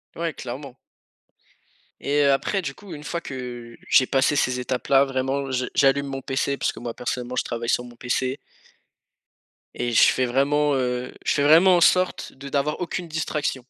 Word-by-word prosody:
Ouais, 165 -1 -2
clairement. 130 +1 -8 1.2
Et 145 +1 +1
heu 140 - +5
après 190 +8 0
du 135 -6 -5
coup 200 -4 -11
une 150 0 -9
fois 170 +2 -4
que 120 -3 -7
j'ai 130 - +6
passé 135 +2 +2
ces 125 -3 +1
étapes 125 0 -3
là 135 0 +5
vraiment, 135 +1 -2
je 125 -1 -1
j'allume 140 +1 +3
mon 135 -1 -5
pc, 135 +1 -1
puisque - - -2
moi 120 -1 -5
personnellement 125 0 -4
je - - +1
travaille 115 0 -4
sur 125 - +1
mon 120 -1 -13
pc 130 +2 -2 1.4
et 120 0 -2
je 115 - +5
fais 130 - 0
vraiment, 145 +4 +2
heu, 125 -1 -2
je - - +2
fais 140 - +1
vraiment 175 +5 +6
en - - +1
sorte 185 +2 +2
de 140 +1 -10
n'avoir 145 +2 -1
aucune 175 0 -4
distraction. 150 -5 -3
135 Hz, 185 wpm, -23 LUFS, 125-145 Hz, 1.4 s, j'ai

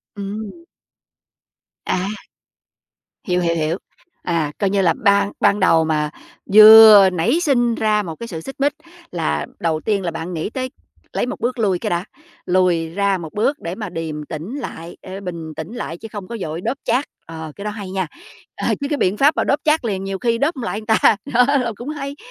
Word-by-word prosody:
Ừm. 210 - -7 1.2
À. 185 +1 -1 1.2
Hiểu, 180 0 +1
hiểu, 170 -1 +1
hiểu. 160 +2 -1 0.5
À, 165 -4 -1
coi 200 - +1
như 200 0 +1
là 170 -3 +3
ban 200 0 +3
ban 205 0 +3
đầu 165 -3 +4
mà 150 -1 0 0.4
vừa 215 -2 +10
nảy 195 - +1
sinh 240 -8 +2
ra 215 -1 +1
một 165 -3 -6
cái 235 - -8
sự 160 -5 -6
xích 270 - -8
mích 285 +1 +2 0.4
là 75 - -1
đầu 160 -2 0
tiên 205 -3 0
là 170 - -2
bạn 165 +2 -6
nghĩ 160 +5 -3
tới 255 +1 -4 0.4
lấy - - 0
1 250 - -5
bước 245 0 -2
lui 190 -5 +1
cái - - -3
đã, 175 0 -1 0.4
lùi 180 -3 +2
ra 195 +2 0
1 160 -3 -8
bước 275 +8 0
để 170 +2 -5
mà 210 -2 -5
điềm 160 -3 -5
tĩnh 160 - -6
lại, 170 -8 -8
ờ, 190 +1 -8
bình 170 -4 -6
tĩnh 160 +8 -7
lại 170 -9 -5
chứ 225 - -9
không 200 -4 -7
có 235 - -6
vội 160 +1 -4
đốp 235 +8 -2
chát, 270 +3 +1 0.2
ờ, 160 -1 -8
cái 200 - -8
đó 210 - -2
hay 205 -3 -7
nha! 190 -3 -2 0.5
Ờ, - - -3
chứ 280 - -1
cái 295 - 0
biện 195 -5 +1
pháp 290 +5 +4
mà - - +1
đốp 280 - +1
chát 305 -4 +2
liền 195 -3 -2
nhiều 195 -1 -4
khi 230 -1 +1
đốp 295 +6 0
hông 255 - -6
lại 215 -2 -3
người 215 - -12
ta, 220 -1 +4 0.2
đó, 250 +1 +5
là 235 -2 -1
cũng 240 +7 -7
hay. 285 -2 -5
200 Hz, 215 wpm, -20 LUFS, 170-230 Hz, 1.2 s, vừa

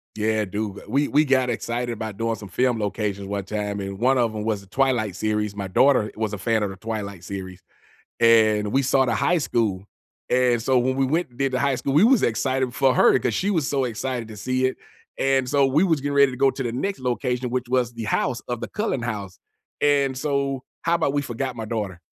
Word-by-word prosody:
Yeah, 110 0 +1
do 105 +1 -4
g - - -10
we 140 +5 +2
we 150 - +3
got 130 -3 +2
excited 120 +1 -2
about 110 -2 -6
doing 115 0 -1
some 100 -2 -10
film 120 +4 +1
locations 100 -1 -3
one 100 -1 -3
time, 105 0 -3
and 95 0 -5
one 130 +5 +3
of 115 -3 +1
'em 105 - -3
was 110 -2 -1
the 100 - -16
Twilight 120 -4 0
series- 105 0 -1
my 100 -2 -4
daughter 110 +1 +3
was 110 -1 -2
a - - -3
fan 110 +2 0
of 100 - -1
the 95 - -8
Twilight 100 -2 -5
series- 95 -2 -7 0.6
and 110 -3 +4
we 135 +5 +2
saw 135 0 +3
the - - +1
high 180 - +2
school, 105 - -1 0.4
and 125 -2 +2
so 130 +1 +3
when 130 +2 0
we 135 0 +2
went 160 +3 0
and 120 - -21
did 135 -1 0
the 130 - 0
high 140 0 +1
school, 135 +2 -2
we 155 +8 +6
was 245 -1 +5
excited 130 +2 0
for 135 -1 +3
her, - - +5
'cause - - -1
she 195 - 0
was 160 -8 0
so 135 -2 +1
excited 120 0 -3
to 110 - -9
see 130 +4 0
it, 130 - -2 0.4
and 135 -1 +1
so 140 +1 +3
we 140 +5 +2
was 165 -6 +2
getting 145 0 -2
ready 140 -1 +5
to 125 - -7
go 135 +1 +4
to 135 - -5
the 120 -2 -3
next 195 +10 -3
location, 125 0 -1
which 125 0 -2
was 125 -2 +1
the 115 -1 -5
house, 120 +3 0
of 120 -1 -3
the - - -5
Cullen 210 - -2
house, 105 -6 -5 0.4
and 140 -2 +2
so, 140 -1 -1 0.2
how 170 +1 +2
'bout 145 -4 0
we 145 - +1
forgot 130 0 -4
my 115 - -4
daughter? 105 -5 -4
120 Hz, 240 wpm, -23 LUFS, 105-135 Hz, 0.6 s, we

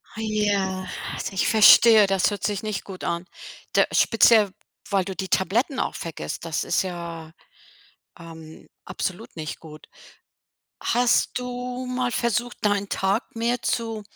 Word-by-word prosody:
Hei 220 - -6
ja, 200 -3 -1 0.3
also - - -5
ich 190 - 0
verstehe, 220 0 +7
das 195 +1 +1
hört 205 -2 -6
sich 205 -1 -2
nicht 215 -2 -3
gut 190 -2 -10
an. 170 +1 -2 0.5
Da - - +4
speziell, 220 -3 +4 0.4
weil 195 -2 +1
du 190 - -5
die 190 0 -5
Tabletten 235 - 0
auch - - -2
vergisst, 135 - -6
das 165 -2 -2
ist - - +1
ja, 170 -3 -7 0.9
ähm, 160 -2 -12 0.2
absolut 185 +3 -5
nicht 155 -2 -6
gut. 155 -1 -13 0.9
Hast 245 0 +2
du 250 0 -5
mal 250 -1 -1
versucht, 240 0 -1
deinen 205 -1 +1
Tag 200 +5 -1
mehr 235 +2 -1
zu, 225 -2 -2
205 Hz, 145 wpm, -24 LUFS, 180-230 Hz, 0.9 s, verstehe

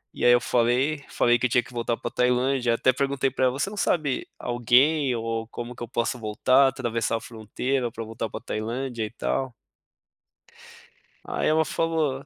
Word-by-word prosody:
e - - -5
aí 120 - +7
eu 120 - +6
falei, 125 +6 +1
falei 120 0 +2
que 125 - +2
eu - - -14
tinha 120 +1 +3
que 125 - -15
voltar 120 0 -1
para 120 - -5
Tailândia, 125 0 +1
até 130 +2 +3
perguntei 135 0 0
para 130 - +1
ela: 125 - +2
"Você 150 +9 -2
não 210 - -8
sabe 150 -8 0
alguém 125 +4 +2
ou 115 -1 -3
como 120 +1 -7
que - - -15
eu 120 - -4
posso 120 +1 -2
voltar, 130 +5 +3
atravessar 120 -4 -1
a - - -6
fronteira 120 +2 -3
para 115 0 -6
voltar 110 0 -5
para - - -6
Tailândia 115 +2 -4
e - - -6
tal?" 130 +2 -2 1.7
Aí - - -1
ela 160 +1 +3
falou 155 -6 -1
125 Hz, 185 wpm, -25 LUFS, 115-135 Hz, 1.7 s, aí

